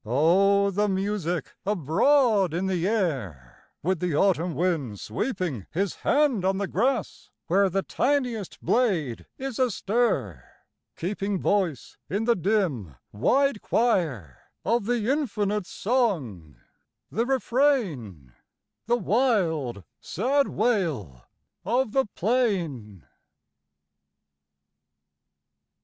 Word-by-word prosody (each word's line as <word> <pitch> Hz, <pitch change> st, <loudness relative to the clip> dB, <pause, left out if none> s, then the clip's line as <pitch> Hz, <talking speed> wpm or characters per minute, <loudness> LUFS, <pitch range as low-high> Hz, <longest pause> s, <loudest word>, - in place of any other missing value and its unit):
O 195 Hz, -, +3 dB
the 205 Hz, +2 st, +1 dB
music 190 Hz, -3 st, -2 dB
abroad 200 Hz, -, +2 dB
in 180 Hz, +2 st, -1 dB
the 185 Hz, -2 st, 0 dB
air, 130 Hz, -, -3 dB
With 185 Hz, +1 st, 0 dB
the 175 Hz, -4 st, -1 dB
autumn 175 Hz, -2 st, +2 dB
wind 145 Hz, -, -1 dB
sweeping 150 Hz, -, -3 dB
His 195 Hz, +3 st, -2 dB
hand 280 Hz, -9 st, +2 dB
on 190 Hz, +1 st, +1 dB
the 200 Hz, -, -1 dB
grass, 240 Hz, +4 st, -1 dB, 0.2 s
where 195 Hz, +3 st, +3 dB
The 195 Hz, +2 st, -1 dB
tiniest 245 Hz, -7 st, -1 dB
blade 175 Hz, -, 0 dB
is 265 Hz, -2 st, -5 dB
astir, 210 Hz, -, 0 dB, 0.5 s
keeping 195 Hz, +2 st, -2 dB
Voice 180 Hz, -, -1 dB
in 205 Hz, +4 st, -1 dB
the 235 Hz, +1 st, +3 dB
dim, 170 Hz, -, -1 dB, 0.2 s
wide 260 Hz, -, +1 dB
choir, 155 Hz, -, 0 dB, 0.3 s
Of 230 Hz, -2 st, +1 dB
the 235 Hz, -3 st, 0 dB
infinite 210 Hz, -, -1 dB
song, 160 Hz, -, -1 dB, 0.6 s
the 230 Hz, +3 st, 0 dB
refrain, 205 Hz, -, 0 dB, 0.5 s
The 240 Hz, +1 st, +3 dB
wild, 180 Hz, -, 0 dB, 0.2 s
sad 280 Hz, +2 st, 0 dB
wail 160 Hz, -, -1 dB, 0.4 s
of 245 Hz, 0 st, 0 dB
the 270 Hz, -1 st, +1 dB
plain 175 Hz, -, -1 dB
195 Hz, 100 wpm, -26 LUFS, 155-235 Hz, 0.6 s, O